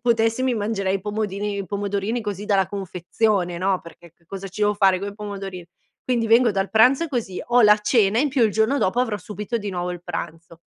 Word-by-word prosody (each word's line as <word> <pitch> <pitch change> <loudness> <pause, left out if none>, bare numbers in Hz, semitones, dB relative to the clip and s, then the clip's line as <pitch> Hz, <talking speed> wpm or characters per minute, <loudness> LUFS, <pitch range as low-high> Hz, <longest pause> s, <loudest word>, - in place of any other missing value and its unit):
potessi 230 0 +2
mi 260 -2 +1
mangerei 205 -3 -1
i - - -9
pomodini 205 0 -3
i 195 - -3
pomodorini 200 +4 -2
così 205 -2 -5
dalla 195 -3 +2
confezione, 185 -1 -1
no, 185 +1 0
perché 170 0 -15
che 170 - -34
cosa 195 +2 -7
ci 195 +3 -5
devo 210 0 +3
fare 195 -2 +3
coi 200 +1 -6
pomodorini, 195 -4 -7 0.4
quindi 240 -3 0
vengo 230 +2 +5
dal 195 -1 -1
pranzo 255 +8 +4
così, 235 - -3
ho 245 +1 +3
la 210 0 +6
cena 210 -1 +2
in 290 +3 +2
più 260 -3 +1
il 220 - +2
giorno 220 +7 +1
dopo 190 +6 0
avrò 235 -4 +1
subito 210 +4 -5
di 205 -3 -4
nuovo 180 -1 -3
il 175 - -9
pranzo. 165 -1 -7
205 Hz, 210 wpm, -22 LUFS, 190-225 Hz, 0.4 s, la